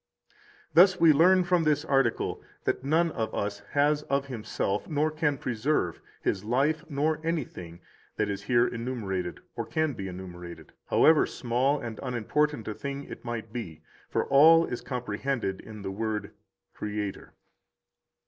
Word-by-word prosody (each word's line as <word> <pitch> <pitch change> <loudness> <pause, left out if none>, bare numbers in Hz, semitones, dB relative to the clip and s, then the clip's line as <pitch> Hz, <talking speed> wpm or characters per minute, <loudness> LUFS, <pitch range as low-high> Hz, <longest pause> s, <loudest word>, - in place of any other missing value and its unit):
16 - - -33 0.4
Thus 180 +3 +6
we 165 -2 +7
learn 180 +5 +5
from 175 -1 +2
this 150 0 +1
article 135 -5 +1 0.2
that - - -1
none 160 +4 +2
of 110 -5 -2
us 100 0 -2
has 145 +1 +3
of 140 0 +1
himself, 110 -5 -3
nor 155 0 +1
can 155 -2 0
preserve, 120 - -1 0.2
his 95 - 0
life 140 +8 +1
nor 150 +2 0
anything 100 - -4 0.4
that 105 - +1
is 100 -1 -3
here 120 +3 +3
enumerated 110 -7 -4
or - - -2
can 155 -2 -1
be 95 -5 -5
enumerated, 90 -2 -9 0.2
however 160 -1 +5
small 130 +4 0
and 115 -2 -6
unimportant 125 +2 -1
a 110 - -2
thing 140 +5 -5
it - - -10
might 115 -2 -5
be, 85 -11 -6 0.3
for - - 0
all 165 +4 +7
is 120 - -5
comprehended 125 -4 -3
in 105 -2 -10
the 95 - -3
word 105 0 -3 0.4
Creator. 105 -2 -5
125 Hz, 150 wpm, -28 LUFS, 105-150 Hz, 0.4 s, we